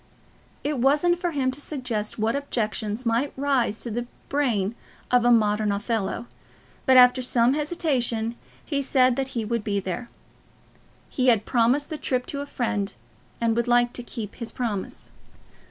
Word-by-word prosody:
It 290 -2 -1
wasn't 300 +7 +3
for 355 - 0
him 270 -5 0
to 275 +3 -8
suggest 250 -8 -3
what 220 +2 0
objections 225 -4 -2
might 235 +5 +1
rise 265 -6 +1
to 235 - -4
the 240 +2 -3 0.2
brain 235 -8 +1 0.4
of 250 -1 +4
a - - +5
modern 210 -2 +3
Othello; 215 +2 -2 0.6
but 260 -1 +7
after 250 0 +7
some 245 0 +3
hesitation 265 -7 0 0.3
he 285 -3 -1
said 255 -2 +3
that 265 -1 -3
he 225 - -1
would 230 0 -1
be 200 -1 0
there. 200 +6 -5 1.0
He 255 -1 -1
had 225 -4 +4
promised 255 +6 +2
the 310 - -4
trip 255 -1 -1
to 280 - -3
a 285 - -6
friend, 225 -7 -2 0.5
and 230 -1 +1
would 235 +1 0
like 240 0 +3
to - - -4
keep 225 -3 -7
his 235 -2 -5
promise. 220 -6 -4
245 Hz, 165 wpm, -25 LUFS, 225-270 Hz, 1.0 s, but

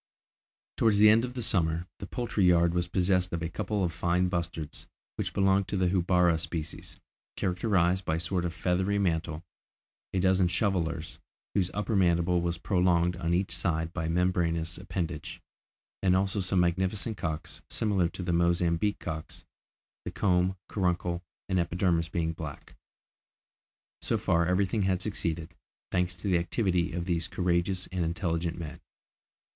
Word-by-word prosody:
Towards 110 -3 +4
the 105 +1 +8
end 115 +2 +4
of 125 0 -8
the 125 - -3
summer, 85 -5 +1
the - - -6
poultry 120 -5 -1
yard 85 -1 +4
was 90 0 0
possessed 90 0 +1
of 85 -1 -2
a 85 - -2
couple 105 +3 -2
of 85 -2 -1
fine 90 +3 +1
bustards, 85 -3 -4 0.3
which - - -3
belonged 95 0 +2
to 100 - -2
the 90 -1 +2
houbara 90 -2 +3
species, 80 -1 -6 0.4
characterised 90 -1 +1
by 80 - 0
a - - -1
sort 85 +2 -1
of 85 - -1
feathery 95 +4 0
mantle; 80 -4 -1 0.7
a 95 - 0
dozen 95 0 +3
shovellers, 85 -4 -1 0.3
whose 95 -3 +1
upper 105 +2 -1
mandible 85 -1 +3
was 85 0 -1
prolonged 90 -1 +2
on 85 -1 0
each 95 +2 0
side 80 -1 -1
by 80 -2 -2
a - - -1
membraneous 85 -1 0
appendage; 85 -3 -4 0.6
and 95 -1 +3
also 95 +2 +1
some 95 -1 +1
magnificent 95 +5 0
cocks, 80 -4 -5
similar 100 -6 +1
to 90 - -7
the 90 -1 -1
Mozambique 85 +3 +2
cocks, 80 -1 -6 0.6
the - - -4
comb, 90 0 +1
caruncle 90 -2 -1 0.3
and 95 -2 +1
epidermis 85 -1 +1
being 80 -2 -1
black. 80 -4 -8 1.3
So - - +1
far, 85 0 +2
everything 95 +3 +1
had 95 -1 +1
succeeded, 85 -4 -3 0.4
thanks 90 0 0
to 95 - -5
the 90 -3 +3
activity 90 -1 0
of 85 +1 -3
these 85 -2 -1
courageous 90 +1 0
and 90 -2 -1
intelligent 85 -1 -1
men. 80 -3 -7
90 Hz, 155 wpm, -29 LUFS, 85-95 Hz, 1.3 s, the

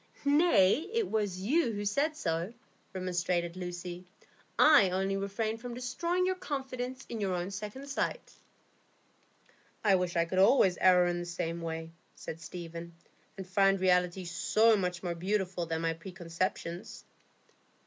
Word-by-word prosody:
"Nay, 285 - +4
it 455 -3 0
was 205 -4 -1
you 255 - +2
who 205 0 -4
said 290 +9 0
so," 165 - -2 0.4
remonstrated 180 -2 -1
Lucy. 175 0 -6 0.5
"I 295 -11 +7
only 190 +2 0
refrained 215 +3 -2
from 245 -1 -6
destroying 340 +9 -1
your 375 - +2
confidence 265 -6 -5
in 225 -2 -5
your 190 -2 0
own 175 +2 -3
second 210 +7 -6
sight." 280 - -3 1.5
"I 205 -3 +4
wish 180 -2 +1
I 170 0 +3
could 185 +2 -1
always 190 -3 +5
err 180 -1 +6
in 175 0 0
the 175 - -4
same 170 -1 -3
way," 165 0 -5 0.2
said 165 +1 -8
Stephen, 170 0 -8 0.4
"and 190 - -6
find 195 +1 +3
reality 180 0 +2
so 220 +6 +3
much 180 -2 -2
more 175 -2 -1
beautiful 185 -1 -2
than 160 0 -2
my 165 0 0
preconceptions." 175 0 -5
190 Hz, 145 wpm, -31 LUFS, 175-225 Hz, 1.5 s, I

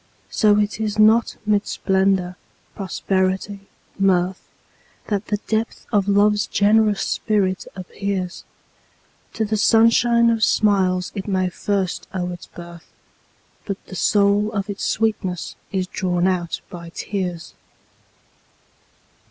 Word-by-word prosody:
So 210 -1 +4
it 210 0 0
is 215 -1 -2
not 220 +2 +4
mid 210 -1 +1
splendor, 190 -2 +1 0.4
prosperity, 195 +1 -2 0.3
mirth, 185 -1 +2 0.7
That 205 -1 -1
the 210 - 0
depth 220 +1 -2
of 205 -3 +2
Love's 205 +1 +3
generous 210 -1 +3
spirit 195 -4 0
appears; 190 -1 -4 0.9
To 220 - -1
the 215 +1 -1
sunshine 230 +2 +4
of 225 -1 0
smiles 190 -4 +2
it 195 -1 -5
may 185 -2 0
first 190 0 -2
owe 180 -1 -2
its 175 - -9
birth, 170 -1 -12 0.8
But 200 -2 -2
the 190 - -10
soul 205 +2 +2
of 200 -1 -2
its 200 - -6
sweetness 195 -5 -1 0.2
is 190 -2 -1
drawn 180 -1 -1
out 180 -3 -1
by 170 -1 -8
tears. 180 -2 -4
200 Hz, 120 wpm, -21 LUFS, 185-210 Hz, 0.9 s, So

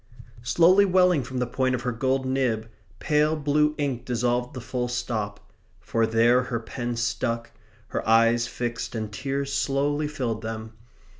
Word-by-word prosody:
Slowly 170 - +5
welling 180 -4 +4
from 125 +1 -6
the 125 - +1
point 130 +1 0
of 125 - -5
her 125 - 0
gold 130 +3 0
nib, 125 -4 0 0.3
pale 150 +1 +2
blue 150 0 +1
ink 135 -5 -2
dissolved 125 0 -1
the - - -4
full 125 +1 -3
stop; 115 -4 -4 0.3
for 115 -1 0
there 115 +3 +4
her 125 -2 -3
pen 120 +1 -4
stuck; 115 0 -2 0.4
her - - -2
eyes 115 +1 +4
fixed, 120 -1 -4
and 110 -2 -4
tears 140 +3 -3
slowly 145 +2 0
filled 125 -7 -3
them. 110 0 -6
125 Hz, 155 wpm, -25 LUFS, 115-140 Hz, 0.4 s, Slowly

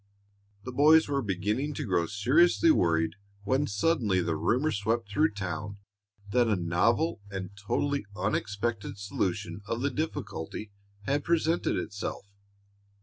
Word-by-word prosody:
The 130 - -6
boys 155 +5 +6
were 140 -1 0
beginning 105 +8 -1
to 150 - -3
grow 90 -5 +1
seriously 155 - +4
worried 80 - +2 0.3
when 130 +7 +1
suddenly 105 - +1
the 85 -2 0
rumor 130 - +1
swept 110 +2 -1
through 155 +3 +2
town 100 +1 -4 0.5
that 120 +1 +3
a 110 - +2
novel 100 - +1
and 95 -1 -5
totally 140 +5 -1
unexpected 105 +1 -2
solution 95 -2 -3
of 115 +2 -2
the 140 +1 0
difficulty 110 - -4 0.3
had 140 +7 0
presented 165 0 +1
itself. 100 -1 -4
105 Hz, 130 wpm, -29 LUFS, 100-145 Hz, 0.5 s, boys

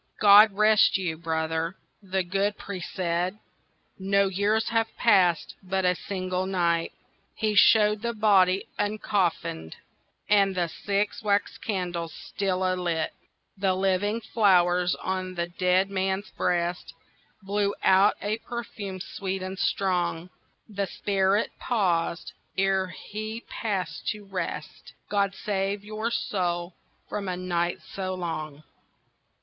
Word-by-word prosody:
"God 205 0 +8
rest 215 0 +5
you, 180 -4 -2
brother," 160 +1 -2 0.3
the 190 -1 -1
good 195 +3 -1
priest 185 -3 -6
said, 180 +2 -1 0.6
"No 195 +1 +2
years 205 +4 +1
have 225 -1 +1
passed—but 190 -2 +2
a 180 - +4
single 185 0 -3
night." 170 -3 +1 0.4
He 215 -2 0
showed 210 0 +5
the 235 0 -2
body 195 -3 +4
uncoffinèd, 190 - -1 0.5
And 200 -2 +3
the 175 -2 0
six 200 +4 -2
wax 205 -1 0
candles 175 -5 -3
still 190 -2 -2
alight. 175 -3 0 0.4
The 190 -1 +1
living 195 +4 0
flowers 180 -5 +3
on 185 -1 -3
the 170 0 -1
dead 185 +2 +1
man's 190 +1 -1
breast 175 0 -1 0.5
Blew 200 +1 0
out 195 +2 +5
a 215 +2 -1
perfume 215 -6 -6
sweet 190 +1 -4
and 185 0 -5
strong. 180 -2 0 0.4
The 200 -2 -3
spirit 195 +1 +1
paused 180 -7 0 0.2
ere 195 -1 +2
he 215 +6 -7
passed 185 -8 -3
to 210 -1 -3
rest— 180 -5 -6 0.2
"God 200 -1 +1
save 200 -1 -2
your 215 +2 -3
soul 175 -6 -2 0.3
from 200 -2 -4
a 180 -1 -2
night 175 -1 -1
so 185 -1 -3
long." 155 -4 -5
190 Hz, 120 wpm, -26 LUFS, 180-205 Hz, 0.6 s, God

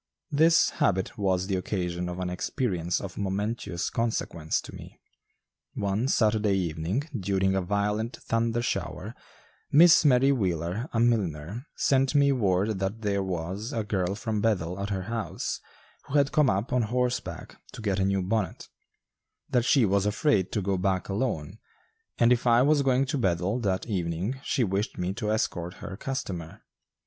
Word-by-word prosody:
This 160 +3 +4
habit 95 -1 0
was 95 -2 0
the 95 0 -1
occasion 90 -2 -2
of 90 - -5
an 90 -1 -3
experience 90 - -1
of 100 -1 -7
momentous 100 -2 -2
consequence 110 -8 -1
to - - -11
me. - - -11 0.8
One 100 +5 0
Saturday 110 -5 +2
evening, 85 - -1
during 95 -2 +1
a 95 - +1
violent 105 +4 -1
thunder 115 +1 -1
shower, - - -3 0.6
Miss 165 +3 +7
Mary 135 -1 +5
Wheeler, 95 - -1
a 115 - 0
milliner, 105 - 0
sent 135 +1 +2
me 140 -1 +5
word 100 -4 +1
that 100 +4 -3
there 100 -1 +1
was 95 - -4
a 115 - -1
girl 95 -2 -1
from 110 -1 -2
Bethel 95 -5 0
at 100 +1 -3
her 95 -2 -2
house, 110 -3 -3 0.5
who 140 - -4
had 140 -1 +3
come 150 -4 +4
up 100 +6 -1
on 125 - +3
horseback 125 +2 -2 0.2
to - - -9
get 100 -2 0
a - - +2
new 95 -1 +1
bonnet; 100 -2 -2 0.8
that 120 -1 +2
she 130 -3 +4
was 100 0 +2
afraid 105 - +1
to 105 - 0
go 95 -1 0
back 95 -1 0
alone; 100 - -2 0.6
and 120 +1 +5
if 125 0 -1
I 120 +1 +5
was 145 +1 +4
going 135 0 +2
to 135 +1 -2
Bethel 95 +2 0
that 95 -5 -1
evening 95 +4 -2
she 130 - +1
wished 100 +1 -1
me 90 +1 -2
to 105 0 -3
escort 90 -4 -1
her 100 - -7
customer. 95 -10 -5
100 Hz, 165 wpm, -27 LUFS, 95-120 Hz, 0.8 s, Miss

